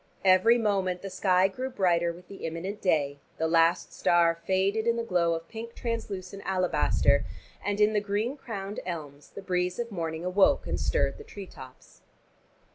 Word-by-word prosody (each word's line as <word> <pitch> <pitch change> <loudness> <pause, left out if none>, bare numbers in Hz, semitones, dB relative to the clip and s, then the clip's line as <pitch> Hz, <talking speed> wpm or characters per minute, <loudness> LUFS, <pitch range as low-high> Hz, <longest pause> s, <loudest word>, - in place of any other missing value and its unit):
Every 190 +6 +6
moment 195 -5 0
the 195 - -5
sky 185 -1 +3
grew 255 +7 -5
brighter 175 -7 +2
with 175 +2 -13
the 195 - -11
imminent 180 +6 -5
day, 145 -6 +1 0.2
the 160 - 0
last 165 +1 +2
star 170 -1 +3
faded 190 +6 0
in 235 - +3
the 235 - -2
glow 170 -6 +1
of 165 0 -7
pink 230 +2 -8
translucent 200 -5 -4
alabaster, 185 -2 +2 0.4
and 205 0 -1
in 210 +1 +4
the 210 - +2
green 210 +6 -1
crowned 205 -7 -6
elms 150 -5 -7
the 200 - -10
breeze 180 -1 -1
of 235 -1 -4
morning 165 -2 -4
awoke, 190 +2 +3
and - - -2
stirred - - 0
the - - -9
tree 205 - -9
tops. 130 -7 -14
190 Hz, 175 wpm, -28 LUFS, 170-210 Hz, 0.4 s, Every